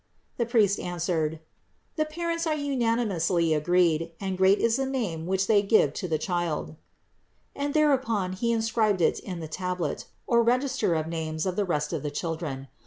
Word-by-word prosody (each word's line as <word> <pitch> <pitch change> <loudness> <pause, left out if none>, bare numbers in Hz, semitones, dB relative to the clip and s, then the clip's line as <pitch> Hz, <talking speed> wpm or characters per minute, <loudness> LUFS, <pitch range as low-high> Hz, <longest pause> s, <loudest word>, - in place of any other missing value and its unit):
The 235 - 0
priest 215 -4 +3
answered: 165 -3 -2 0.5
"The 310 - +1
parents 335 +1 -2
are 310 - +1
unanimously 225 - +1
agreed, 165 +1 +2
and 190 -1 -2
great 190 +2 +4
is 230 0 +2
the 270 0 -1
name 195 -12 -3
which 190 +1 +1
they 205 -1 +4
give 200 -8 +3
to 185 - -4
the 160 -2 0
Child"; 175 -3 -2 0.8
and 285 +1 -3
thereupon 260 -11 +2
he 235 +5 -1
inscribed 220 -4 +1
it - - +2
in 180 -3 -6
the 160 - -5
tablet 180 -1 -3 0.2
or 235 -1 +3
register 250 -5 +1
of 155 -1 -1
names 160 0 -3
of 185 -1 -1
the 205 - 0
rest 150 -3 -1
of 160 - -2
the 150 - -3
children. 150 -3 -4
185 Hz, 175 wpm, -27 LUFS, 165-235 Hz, 0.8 s, great